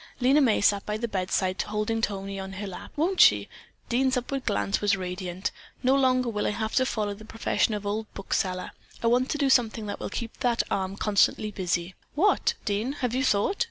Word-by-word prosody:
Lena 270 Hz, +4 st, +4 dB
May 235 Hz, -6 st, +3 dB
sat 200 Hz, -1 st, +3 dB
by 210 Hz, 0 st, -3 dB
the 235 Hz, +2 st, -2 dB
bedside 185 Hz, -2 st, -1 dB
holding 215 Hz, +2 st, -1 dB
Tony 195 Hz, -1 st, -3 dB
on 190 Hz, 0 st, -6 dB
her 200 Hz, +2 st, -5 dB
lap. 190 Hz, -2 st, -8 dB
"Won't 350 Hz, +6 st, +2 dB
she?" -, -, +6 dB, 0.4 s
Dean's 260 Hz, +2 st, +2 dB
upward 260 Hz, +2 st, -3 dB
glance 205 Hz, -1 st, 0 dB
was 205 Hz, -1 st, +2 dB
radiant. 180 Hz, 0 st, -4 dB, 0.3 s
"No 255 Hz, +1 st, +4 dB
longer 255 Hz, -2 st, +3 dB
will 210 Hz, -3 st, -1 dB
I -, -, +2 dB
have 220 Hz, +1 st, -3 dB
to 260 Hz, -1 st, +3 dB
follow 210 Hz, -4 st, -1 dB
the 210 Hz, +2 st, -12 dB
profession 225 Hz, 0 st, 0 dB
of 205 Hz, 0 st, -5 dB
old 215 Hz, +2 st, -3 dB
book 195 Hz, -, -5 dB
seller. 185 Hz, -1 st, -1 dB, 0.3 s
I -, -, 0 dB
want 245 Hz, +3 st, +3 dB
to 300 Hz, -, -1 dB
do 285 Hz, -2 st, +2 dB
something 225 Hz, -3 st, +2 dB
that 205 Hz, -, -5 dB
will -, -, -4 dB
keep 230 Hz, +2 st, -5 dB
that 240 Hz, -2 st, +2 dB
arm 190 Hz, 0 st, -1 dB
constantly 210 Hz, +1 st, +2 dB
busy." 180 Hz, -2 st, -2 dB, 0.2 s
"What, 390 Hz, +8 st, +3 dB
Dean, 215 Hz, +5 st, -1 dB
have 250 Hz, -5 st, -2 dB
you 260 Hz, +1 st, +1 dB
thought?" 210 Hz, -, +2 dB
215 Hz, 210 wpm, -27 LUFS, 195-250 Hz, 0.4 s, she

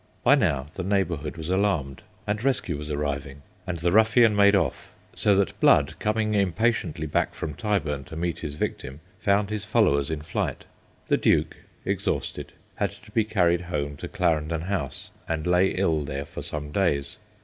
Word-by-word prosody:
By -, -, +6 dB
now 70 Hz, -1 st, +2 dB
the 95 Hz, -, -4 dB
neighbourhood 90 Hz, -6 st, -1 dB
was 80 Hz, +1 st, -6 dB
alarmed, 95 Hz, -9 st, 0 dB, 0.2 s
and 105 Hz, +1 st, -2 dB
rescue 125 Hz, -, 0 dB
was 75 Hz, +1 st, -6 dB
arriving, 70 Hz, -1 st, -3 dB, 0.2 s
and 90 Hz, -2 st, -2 dB
the 85 Hz, +1 st, 0 dB
ruffian 110 Hz, +2 st, +5 dB
made 100 Hz, 0 st, +6 dB
off, 95 Hz, -, -1 dB, 0.2 s
so 100 Hz, -, +3 dB
that 100 Hz, 0 st, 0 dB
Blood -, -, +5 dB
coming 110 Hz, 0 st, 0 dB
impatiently 100 Hz, -4 st, 0 dB
back 75 Hz, -, 0 dB
from 75 Hz, -, -4 dB
Tyburn 75 Hz, -8 st, -1 dB
to 80 Hz, -, -10 dB
meet 85 Hz, 0 st, -2 dB
his 75 Hz, -, -5 dB
victim, 70 Hz, -2 st, -4 dB, 0.2 s
found 100 Hz, +1 st, +1 dB
his 105 Hz, -1 st, -2 dB
followers 105 Hz, -11 st, +2 dB
in 80 Hz, -2 st, -3 dB
flight. 80 Hz, -, -3 dB, 0.4 s
The -, -, +3 dB
Duke, -, -, +2 dB, 0.3 s
exhausted, -, -, -2 dB, 0.2 s
had -, -, +1 dB
to -, -, -17 dB
be 110 Hz, -, +2 dB
carried 90 Hz, -5 st, +2 dB
home 75 Hz, -5 st, -3 dB
to -, -, -6 dB
Clarendon 80 Hz, 0 st, 0 dB
House, 85 Hz, -6 st, -4 dB, 0.2 s
and 80 Hz, -2 st, -2 dB
lay 90 Hz, +1 st, +4 dB
ill 80 Hz, -5 st, +1 dB
there 70 Hz, 0 st, -4 dB
for -, -, -8 dB
some 75 Hz, -1 st, -5 dB
days. 75 Hz, -6 st, 0 dB
85 Hz, 170 wpm, -25 LUFS, 75-100 Hz, 0.4 s, By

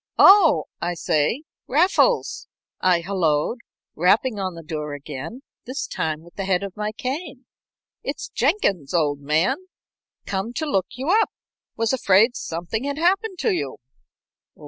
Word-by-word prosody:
"Oh, 375 Hz, -7 st, +7 dB, 0.2 s
I 175 Hz, +1 st, -1 dB
say, 160 Hz, -, 0 dB, 0.2 s
Raffles," 365 Hz, -, +2 dB, 0.3 s
I 180 Hz, -2 st, +3 dB
hallooed, 170 Hz, +2 st, 0 dB, 0.4 s
rapping 205 Hz, +6 st, +2 dB
on 185 Hz, -2 st, -3 dB
the 165 Hz, -, -9 dB
door 150 Hz, -2 st, -4 dB
again, 145 Hz, -, -7 dB, 0.2 s
this 265 Hz, +3 st, -3 dB
time 155 Hz, 0 st, -3 dB
with 170 Hz, -, -16 dB
the 195 Hz, -, -4 dB
head 190 Hz, 0 st, +1 dB
of 195 Hz, -2 st, -6 dB
my 210 Hz, 0 st, -2 dB
cane. 270 Hz, +3 st, -5 dB, 0.6 s
"It's -, -, -5 dB
Jenkins, 180 Hz, -, 0 dB
old 145 Hz, -4 st, +1 dB
man. 155 Hz, -, +1 dB, 0.7 s
Came 200 Hz, +4 st, -3 dB
to 315 Hz, -, -2 dB
look 195 Hz, -, 0 dB
you 265 Hz, +5 st, -3 dB
up. 440 Hz, +2 st, +4 dB, 0.5 s
Was 225 Hz, +2 st, +1 dB
afraid 225 Hz, 0 st, +4 dB
something 175 Hz, +9 st, -4 dB
had 285 Hz, 0 st, -2 dB
happened 380 Hz, +4 st, +1 dB
to -, -, +2 dB
you." 145 Hz, -6 st, -3 dB
200 Hz, 145 wpm, -23 LUFS, 165-270 Hz, 0.7 s, Oh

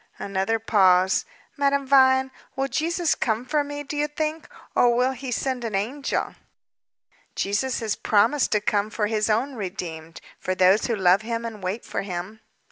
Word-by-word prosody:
Another 195 Hz, +3 st, -1 dB
pause. 190 Hz, -4 st, +3 dB, 0.3 s
"Madame 280 Hz, -1 st, +1 dB
Vine, 265 Hz, -1 st, +4 dB, 0.2 s
will 270 Hz, 0 st, -1 dB
Jesus 335 Hz, +3 st, 0 dB
come 225 Hz, 0 st, -1 dB
for 295 Hz, +2 st, +1 dB
me, 290 Hz, 0 st, -6 dB
do 290 Hz, +1 st, -6 dB
you 295 Hz, 0 st, 0 dB
think, 310 Hz, +1 st, -4 dB, 0.3 s
or 240 Hz, -1 st, +4 dB
will 250 Hz, +2 st, +2 dB
He 265 Hz, 0 st, -7 dB
send 255 Hz, 0 st, -2 dB
an 225 Hz, -3 st, -3 dB
angel?" 250 Hz, +9 st, -2 dB, 1.0 s
"Jesus 215 Hz, +7 st, -1 dB
has 220 Hz, -2 st, -1 dB
promised 230 Hz, +7 st, +2 dB
to 210 Hz, -, +2 dB
come 205 Hz, 0 st, 0 dB
for 220 Hz, -1 st, -1 dB
His 215 Hz, 0 st, 0 dB
own 240 Hz, +6 st, +1 dB
redeemed 170 Hz, -6 st, -6 dB, 0.2 s
for 185 Hz, -, -2 dB
those 185 Hz, +3 st, +4 dB
who 235 Hz, -, 0 dB
love 190 Hz, 0 st, +4 dB
Him 230 Hz, +1 st, -3 dB
and 220 Hz, -3 st, -7 dB
wait 190 Hz, +5 st, -4 dB
for -, -, -3 dB
Him." 190 Hz, +3 st, -6 dB
225 Hz, 170 wpm, -24 LUFS, 200-270 Hz, 1.0 s, Vine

